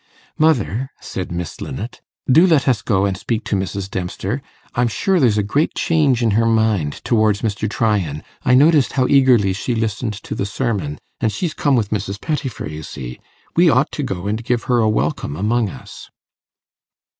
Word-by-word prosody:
'Mother,' 135 Hz, -5 st, +1 dB
said 90 Hz, -2 st, -6 dB
Miss 85 Hz, -2 st, -5 dB
Linnet, 110 Hz, -, -6 dB, 0.2 s
'do 160 Hz, +8 st, +6 dB
let 155 Hz, -6 st, +3 dB
us 120 Hz, -4 st, +2 dB
go 100 Hz, -4 st, +1 dB
and 100 Hz, -1 st, 0 dB
speak 110 Hz, +3 st, -3 dB
to -, -, -1 dB
Mrs. 95 Hz, 0 st, -3 dB
Dempster. 95 Hz, +6 st, -3 dB, 0.3 s
I'm 120 Hz, 0 st, +2 dB
sure 190 Hz, -, +1 dB
there's 120 Hz, -7 st, +3 dB
a 105 Hz, -, +2 dB
great 140 Hz, +10 st, 0 dB
change 145 Hz, -7 st, +2 dB
in 115 Hz, -, +3 dB
her 115 Hz, +2 st, +2 dB
mind 110 Hz, -9 st, +2 dB
towards 110 Hz, -3 st, +2 dB
Mr. 110 Hz, -1 st, -1 dB
Tryan. 100 Hz, -10 st, 0 dB, 0.2 s
I 125 Hz, -, +4 dB
noticed 145 Hz, 0 st, +4 dB
how 130 Hz, -2 st, +2 dB
eagerly 125 Hz, -8 st, +4 dB
she 115 Hz, +5 st, -2 dB
listened 110 Hz, 0 st, -2 dB
to 100 Hz, -, -7 dB
the 100 Hz, -, -2 dB
sermon, 100 Hz, -, -2 dB, 0.2 s
and 110 Hz, -, +1 dB
she's 165 Hz, -, -2 dB
come 145 Hz, -2 st, +2 dB
with 110 Hz, -4 st, 0 dB
Mrs. 100 Hz, -1 st, -3 dB
Pettifer, 145 Hz, -, -3 dB
you 75 Hz, 0 st, -7 dB
see. 65 Hz, -5 st, -8 dB, 0.4 s
We 170 Hz, 0 st, +5 dB
ought 130 Hz, 0 st, +2 dB
to -, -, -4 dB
go 95 Hz, -9 st, -4 dB
and 110 Hz, +3 st, -2 dB
give 120 Hz, 0 st, 0 dB
her 125 Hz, -1 st, +2 dB
a 110 Hz, -1 st, +3 dB
welcome 75 Hz, -8 st, -1 dB
among 110 Hz, +4 st, +1 dB
us. -, -, -11 dB
110 Hz, 185 wpm, -19 LUFS, 100-130 Hz, 0.4 s, do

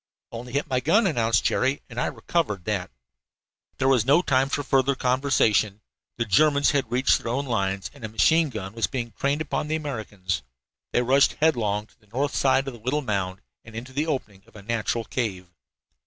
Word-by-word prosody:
"Only 120 Hz, +1 st, -8 dB
hit 140 Hz, +3 st, 0 dB
my 130 Hz, -3 st, +1 dB
gun," 210 Hz, -, +3 dB
announced 115 Hz, -9 st, +2 dB
Jerry, 135 Hz, +2 st, +1 dB
"and 120 Hz, -1 st, -4 dB
I -, -, +1 dB
recovered 105 Hz, -, -2 dB
that." 100 Hz, -4 st, -2 dB, 0.9 s
There 130 Hz, -, +1 dB
was 130 Hz, -4 st, +4 dB
no 145 Hz, +8 st, +4 dB
time 135 Hz, -2 st, +2 dB
for 145 Hz, -, -1 dB
further 135 Hz, 0 st, +2 dB
conversation. 125 Hz, -6 st, +2 dB, 0.4 s
The 115 Hz, -, 0 dB
Germans 140 Hz, +7 st, +4 dB
had 140 Hz, -4 st, -1 dB
reached 130 Hz, +3 st, +3 dB
their 115 Hz, -, -4 dB
own 140 Hz, +3 st, -1 dB
lines, 100 Hz, -5 st, -1 dB
and 140 Hz, -4 st, -15 dB
a 110 Hz, -, -4 dB
machine 155 Hz, -, +3 dB
gun 95 Hz, -5 st, -6 dB
was 115 Hz, 0 st, 0 dB
being 120 Hz, -3 st, -4 dB
trained 140 Hz, +7 st, -1 dB
upon 150 Hz, -1 st, -2 dB
the 155 Hz, -, 0 dB
Americans. 105 Hz, -, -4 dB, 0.5 s
They 120 Hz, -, +2 dB
rushed 135 Hz, +3 st, +4 dB
headlong 110 Hz, -9 st, +1 dB
to 110 Hz, -, -29 dB
the 105 Hz, -, -28 dB
north 135 Hz, +7 st, -2 dB
side 135 Hz, 0 st, +2 dB
of 135 Hz, -, -4 dB
the 120 Hz, -, -12 dB
little 135 Hz, +7 st, -1 dB
mound, 95 Hz, -4 st, -2 dB, 0.2 s
and 115 Hz, -1 st, -13 dB
into 125 Hz, +3 st, -7 dB
the 150 Hz, +4 st, -1 dB
opening 110 Hz, -10 st, -3 dB
of 115 Hz, -, -23 dB
a 105 Hz, -, -11 dB
natural 115 Hz, +1 st, -1 dB
cave. 95 Hz, -7 st, -3 dB
125 Hz, 200 wpm, -25 LUFS, 110-140 Hz, 0.9 s, was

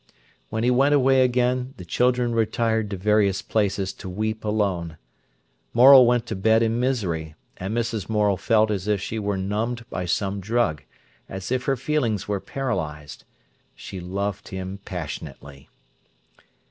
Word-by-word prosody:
When 110 Hz, +1 st, -2 dB
he 125 Hz, -, +3 dB
went 135 Hz, +4 st, +4 dB
away 135 Hz, -1 st, +4 dB
again 125 Hz, +1 st, 0 dB
the 90 Hz, -, -9 dB
children 125 Hz, +5 st, +1 dB
retired 110 Hz, -1 st, 0 dB
to 100 Hz, -, -4 dB
various 100 Hz, -1 st, +2 dB
places 100 Hz, -3 st, -1 dB
to 95 Hz, -, -9 dB
weep 110 Hz, +3 st, -3 dB
alone. 95 Hz, -7 st, -1 dB, 0.8 s
Morel 130 Hz, +1 st, +9 dB
went 120 Hz, -1 st, +2 dB
to 110 Hz, -, -4 dB
bed 110 Hz, +4 st, +3 dB
in 115 Hz, +1 st, 0 dB
misery, 90 Hz, -, -2 dB, 0.2 s
and 100 Hz, +5 st, -3 dB
Mrs. 115 Hz, -3 st, -2 dB
Morel 105 Hz, -2 st, +2 dB
felt 110 Hz, +2 st, +2 dB
as 100 Hz, -1 st, -3 dB
if 105 Hz, -1 st, +1 dB
she 110 Hz, +3 st, -4 dB
were 100 Hz, -1 st, -1 dB
numbed 110 Hz, +5 st, -3 dB
by 90 Hz, -, -3 dB
some 100 Hz, +3 st, -1 dB
drug, 100 Hz, -, 0 dB, 0.5 s
as 95 Hz, +3 st, -6 dB
if 130 Hz, 0 st, 0 dB
her 135 Hz, -1 st, +1 dB
feelings 125 Hz, -6 st, -1 dB
were 100 Hz, -1 st, -1 dB
paralysed. 80 Hz, -, -4 dB, 0.5 s
She 95 Hz, -, -8 dB
loved 100 Hz, +3 st, -4 dB
him 95 Hz, +1 st, -6 dB
passionately. 75 Hz, -5 st, -8 dB
105 Hz, 150 wpm, -24 LUFS, 95-120 Hz, 0.8 s, Morel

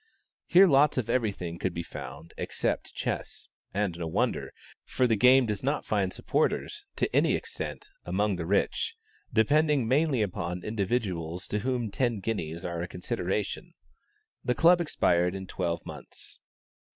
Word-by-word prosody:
Here 185 Hz, +3 st, +8 dB
lots 145 Hz, -4 st, +4 dB
of 115 Hz, -2 st, 0 dB
every 115 Hz, -4 st, +2 dB
thing 85 Hz, -3 st, -6 dB
could 95 Hz, -2 st, -2 dB
be 85 Hz, -, -2 dB
found 75 Hz, +1 st, -9 dB
except -, -, -2 dB
chess, -, -, -4 dB, 0.2 s
and 100 Hz, -4 st, -1 dB
no 85 Hz, -, -2 dB
wonder, 80 Hz, -, -1 dB, 0.3 s
for 130 Hz, -, 0 dB
the 115 Hz, -2 st, +3 dB
game 125 Hz, +4 st, +6 dB
does 105 Hz, -3 st, -2 dB
not 140 Hz, +3 st, -1 dB
find 100 Hz, -3 st, 0 dB
supporters, -, -, -1 dB
to -, -, -1 dB
any -, -, +4 dB
extent, -, -, -6 dB, 0.2 s
among 100 Hz, +3 st, 0 dB
the 85 Hz, -2 st, -4 dB
rich, 100 Hz, -, +1 dB, 0.4 s
depending 145 Hz, +3 st, +3 dB
mainly 135 Hz, -2 st, +3 dB
upon 90 Hz, -2 st, -3 dB
individuals 95 Hz, -6 st, -2 dB
to 105 Hz, -, 0 dB
whom 120 Hz, -1 st, -1 dB
ten 120 Hz, 0 st, 0 dB
guineas 85 Hz, -5 st, -3 dB
are 85 Hz, -1 st, -3 dB
a 90 Hz, -, -3 dB
consideration. 95 Hz, +2 st, -3 dB, 0.7 s
The 125 Hz, -, +1 dB
club 170 Hz, +4 st, +6 dB
expired 90 Hz, -, +2 dB
in 95 Hz, 0 st, -5 dB
twelve 85 Hz, -2 st, -3 dB
months. -, -, -10 dB
105 Hz, 150 wpm, -28 LUFS, 90-125 Hz, 0.7 s, Here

